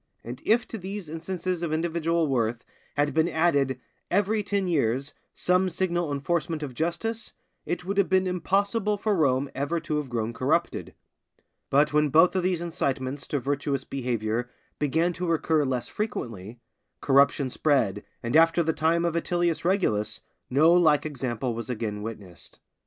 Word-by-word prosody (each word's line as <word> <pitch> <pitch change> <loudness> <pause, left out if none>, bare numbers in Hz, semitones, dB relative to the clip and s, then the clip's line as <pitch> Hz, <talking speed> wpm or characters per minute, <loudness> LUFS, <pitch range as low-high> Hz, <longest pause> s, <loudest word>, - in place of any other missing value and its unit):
And 125 +3 -7
if 235 +2 +2
to 225 - -5
these 190 -2 -6
instances 175 +2 -3
of 170 -3 -2
individual 165 +1 0
worth 120 -4 -1 0.3
had 145 0 +2
been 160 +2 +2
added, 140 -6 +1 0.3
every 205 +3 +2
ten 200 -1 -1
years, 140 -4 0 0.2
some 180 +1 +2
signal 175 -2 -1
enforcement 160 +2 -1
of 135 -3 -5
justice, 175 - -3 0.3
it 175 0 -3
would 200 +2 -1
have 200 - +2
been 190 0 +3
impossible 200 +4 0
for 205 +1 0
Rome 140 -4 +1
ever 145 +5 -1
to 155 -2 -2
have 150 -3 -3
grown 115 -1 -2
corrupted. - - -1 0.7
But 145 +2 +3
when 150 0 +3
both 165 +6 +5
of 185 - +2
these 180 -2 0
incitements 140 -5 -2
to 145 - -1
virtuous 140 0 -1
behavior 120 -2 -2 0.3
began 160 +4 +1
to 180 +1 -4
recur 160 -2 +2
less 130 -2 -2
frequently, 115 - -5 0.4
corruption 140 -1 +3
spread, 135 -11 +1 0.2
and 120 +4 -2
after 165 +1 +5
the 160 0 0
time 160 +2 +1
of 170 -1 0
Atilius 175 0 0
Regulus, 110 - 0 0.3
no 155 +6 +5
like 155 -4 +4
example 125 -4 -3
was 115 0 -6
again 110 -3 -3
witnessed. 105 -6 -9
155 Hz, 155 wpm, -26 LUFS, 130-175 Hz, 0.7 s, both